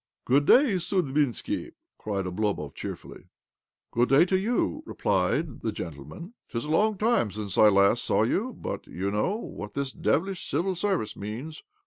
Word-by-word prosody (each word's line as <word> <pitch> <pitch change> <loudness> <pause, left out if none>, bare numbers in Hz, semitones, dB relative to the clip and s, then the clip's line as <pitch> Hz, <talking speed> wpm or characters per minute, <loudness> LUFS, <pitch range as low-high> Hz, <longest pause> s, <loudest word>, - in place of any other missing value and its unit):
" - - -59
Good 140 +4 +3
day, 255 -8 +6
Sudbinski 160 - 0
1 340 - -13 0.2
" - - -65
cried 100 -3 -2
Oblomov 90 -5 -2
cheerfully. - - -8 0.3
" - - -64
Good 120 +1 +2
day 140 +6 +6
to 190 - +1
you," 235 +9 0
replied 105 - 0
the 110 - -1
gentle 75 -9 -7
Зо - - -13
OBLOMOV 80 - -9
man. 180 +7 -10
" - - -55
'Tis 115 +2 -3
a 150 - -3
long 210 +5 +3
time 220 - +2
since 100 -1 -5
I 110 - +7
last 100 -1 +4
saw - - +2
you, - - 0
but - - -5
you 95 +3 -3
know 105 - 0
what 105 - -7
this 140 -1 -2
devilish 190 +7 -1
Civil 175 +6 0
Service 180 - -1
means. 120 +11 -6
140 Hz, 195 wpm, -27 LUFS, -, 0.3 s, I